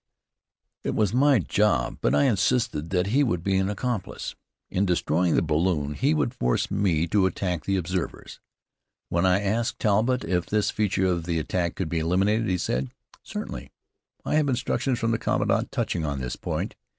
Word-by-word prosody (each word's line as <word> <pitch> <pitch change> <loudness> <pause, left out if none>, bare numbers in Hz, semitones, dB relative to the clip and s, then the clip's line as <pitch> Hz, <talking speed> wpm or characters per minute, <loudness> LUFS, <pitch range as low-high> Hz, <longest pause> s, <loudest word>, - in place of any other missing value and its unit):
It - - -2
was 105 -1 +1
my 140 +2 +5
job, 105 +1 +1
but - - +2
I - - +4
insisted 115 - +1
that 90 0 +1
he 145 +2 +4
would 90 -10 -1
be 95 0 +1
an 95 +1 +1
accomplice. 110 -1 -3 0.4
In 95 - +1
destroying 90 -2 +1
the - - +3
balloon, 75 -2 0
he 140 - +1
would 125 -5 0
force 60 - 0
me 85 -5 +1
to 100 -1 +3
attack 90 -4 -3
the 100 0 +1
observers. 90 0 -4 0.7
When 85 +2 +2
I 90 +2 +3
asked 110 +3 0
Talbott 115 +5 +2
if 90 0 0
this 105 -1 +1
feature 100 -3 0
of 85 -2 0
the 85 -1 0
attack 85 +2 -1
could 95 - -2
be 80 +1 -1
eliminated 95 +7 +1
he 90 - +1
said: 65 -5 -1 0.3
"Certainly. - - -6 0.6
I - - -1
have 150 -2 +2
instructions 125 0 0
from 115 -1 0
the 115 - 0
commandant - - 0
touching 80 - -1
on 70 -3 -2
this 60 -1 -4
point. - - -3
95 Hz, 180 wpm, -25 LUFS, 85-110 Hz, 0.7 s, my